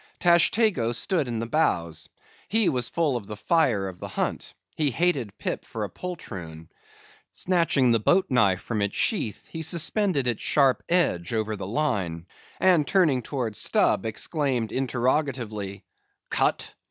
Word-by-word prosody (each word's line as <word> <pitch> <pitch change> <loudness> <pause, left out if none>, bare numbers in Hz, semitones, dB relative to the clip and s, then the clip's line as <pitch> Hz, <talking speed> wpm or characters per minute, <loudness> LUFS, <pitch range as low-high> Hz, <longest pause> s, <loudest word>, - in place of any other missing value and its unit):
Tashtego 175 - +3
stood 170 - 0
in 120 -2 -3
the 115 - -2
bows. 85 - 0 0.4
He 220 -2 +2
was 125 -3 -1
full 160 -6 0
of 110 -5 -5
the 105 - -7
fire 120 - +2
of 90 -2 -9
the - - -6
hunt. - - -3 0.2
He 150 -2 +1
hated 135 - 0
Pip - - -3
for 110 - -5
a 100 - -5
poltroon. 90 - -8 0.7
Snatching 165 -8 +2
the 115 - +3
boat 180 - +3
knife 100 -8 +2
from 110 -1 -3
its 100 0 -2
sheath, 155 - -1
he 160 - -5
suspended 170 - 0
its 120 -3 -1
sharp 135 -3 +3
edge 120 - +1
over 110 -1 -1
the 95 -2 -6
line, 95 - -1 0.3
and 175 -6 +4
turning 160 -10 +3
towards 120 -4 -3
Stubb, 115 - +2
exclaimed 125 -2 -1
interrogatively, 125 -6 -1 0.5
"Cut?" - - 0
125 Hz, 150 wpm, -25 LUFS, 105-165 Hz, 0.7 s, and